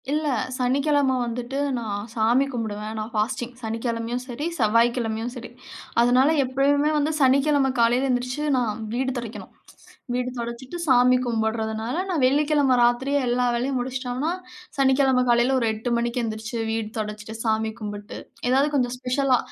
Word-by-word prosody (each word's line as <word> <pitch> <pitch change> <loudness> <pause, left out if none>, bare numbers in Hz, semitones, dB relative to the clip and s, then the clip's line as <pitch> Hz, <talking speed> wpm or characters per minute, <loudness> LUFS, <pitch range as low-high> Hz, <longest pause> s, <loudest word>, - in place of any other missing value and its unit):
இல்ல, 305 +1 0 0.3
சனிக்கிழமை 275 +1 +2
வந்துட்டு 240 +3 -4 0.2
நான் 205 -2 -4
சாமி 235 +4 +3
கும்பிடுவேன் 220 -3 -4
நான் 215 +2 -5
ஃபாஸ்டிங், 240 +3 -1
சனிக்கிழமையும் 230 +1 -2
சரி, 260 +4 -5
செவ்வாய்க்கிழமையும் 230 0 +1
சரி, 245 -2 -8 0.5
அதனால 250 +4 +4
எப்பயுமே 280 +3 +2
வந்து 295 +1 +1
சனிக்கிழமை 275 +1 +4
காலையில 240 +3 +3
எந்திரிச்சு 250 +3 -1
நான் 225 -4 -1
வீடு 260 +2 0
தொடைக்கணும். 235 -2 -7 0.6
வீடு 250 0 -1
தொடைச்சுட்டு 235 +6 -6
சாமி 250 -1 +5
கும்பிடறதுனால, 220 0 -1
நான் 325 -7 0
வெள்ளிக்கிழமை 285 0 +3
ராத்திரியே 260 +4 +2
எல்லா 245 +1 +1
வேலையும் 260 +3 -1
முடிச்சுட்டோம்னா, 255 +4 -2 0.5
சனிக்கிழமை 265 -1 +3
காலையில் 240 +2 +3
ஒரு 230 - 0
8:00 220 +3 -4
மணிக்கு 235 +1 -1
எந்திரிச்சு, 220 0 -4
வீடு 225 -1 -2
துடைச்சிட்டு 210 +1 -5
சாமி 220 -1 0
கும்பிட்டு, 205 -1 -7 0.3
ஏதாவது 270 +3 +3
கொஞ்சம் 250 -2 +1
ஸ்பெஷலா 255 +1 +1
245 Hz, 135 wpm, -24 LUFS, 230-265 Hz, 0.6 s, சாமி